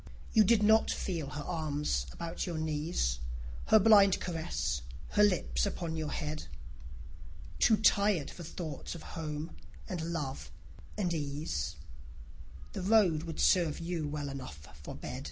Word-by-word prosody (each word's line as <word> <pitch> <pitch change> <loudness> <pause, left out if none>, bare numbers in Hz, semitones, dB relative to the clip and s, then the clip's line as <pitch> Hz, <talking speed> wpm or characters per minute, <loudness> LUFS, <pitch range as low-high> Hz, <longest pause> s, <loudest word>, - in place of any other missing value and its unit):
You 220 - +7
did 210 +1 +4
not 220 +1 +5
feel 165 -7 -2
her 145 0 -5
arms 150 - -1
about 170 - -4
your 170 -2 -3
knees, 155 - -1 0.5
Her 220 - +7
blind 200 -2 +6
caress, 160 - -2 0.3
her 210 - +2
lips 205 0 +3
upon 170 -4 -3
your 155 -2 -2
head: 155 0 -4 1.1
Too 220 -3 +5
tired 200 -7 +3
for - - -10
thoughts 160 -2 -6
of 165 - -9
home 155 - -5 0.3
and 170 -2 -3
love 140 - -4 0.5
and 180 -5 0
ease, 140 - -3 1.0
The - - -4
road 190 -6 +4
would 165 -2 -6
serve 170 -5 +4
you 165 -2 -3
well 145 -1 -3
enough 75 - -8
for - - -7
bed. 65 - -6
160 Hz, 140 wpm, -32 LUFS, 145-185 Hz, 1.1 s, You